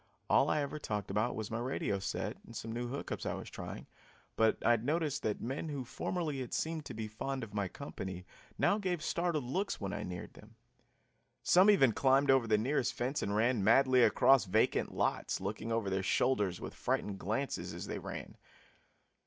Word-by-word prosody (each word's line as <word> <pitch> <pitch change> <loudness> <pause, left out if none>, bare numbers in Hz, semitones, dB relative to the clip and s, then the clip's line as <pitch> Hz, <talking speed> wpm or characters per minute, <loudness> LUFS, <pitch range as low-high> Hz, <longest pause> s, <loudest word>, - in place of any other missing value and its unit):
All - - +5
I 150 - +2
ever 145 +2 -5
talked 105 -7 -3
about 105 +5 0
was 110 -1 -5
my 115 - -2
radio 120 -5 -1
set 95 0 -3
and 115 - -13
some 115 +1 -5
new 120 +1 -3
hook 135 +4 -5
ups - - -3
I - - -2
was - - -8
trying, - - -7 0.5
but 110 0 +3
I - - +6
had 115 -2 +2
noticed 150 0 0
that 105 -5 -2
men 135 +7 -3
who 140 -4 -4
formerly 155 +2 -3
had 125 -2 -4
seemed 160 -1 -2
to - - -7
be 110 0 -4
fond 130 +5 -4
of 105 -3 -8
my 100 -2 -1
company 95 -7 -7 0.3
now 205 - +3
gave 180 -5 -2
startled 170 -4 0
looks 185 +12 -2
when 100 -2 -3
I 105 - -3
neared 90 -3 -6
them. 110 +1 -16 0.9
Some 185 +4 +6
even 135 - +6
climbed 135 +3 +4
over 130 -3 +4
the 110 -1 +4
nearest 125 +3 0
fence 130 +4 -1
and 100 - -1
ran 115 -1 +2
madly 130 +4 +5
across 135 0 +5
vacant 105 +4 +2
lots, - - -1
looking 105 +4 -4
over 115 -3 0
their 95 0 0
shoulders 100 -2 +1
with - - -6
frightened 100 -2 -2
glances 115 +9 -2
as - - -6
they - - -4
ran. - - -7
120 Hz, 200 wpm, -33 LUFS, 105-140 Hz, 0.9 s, I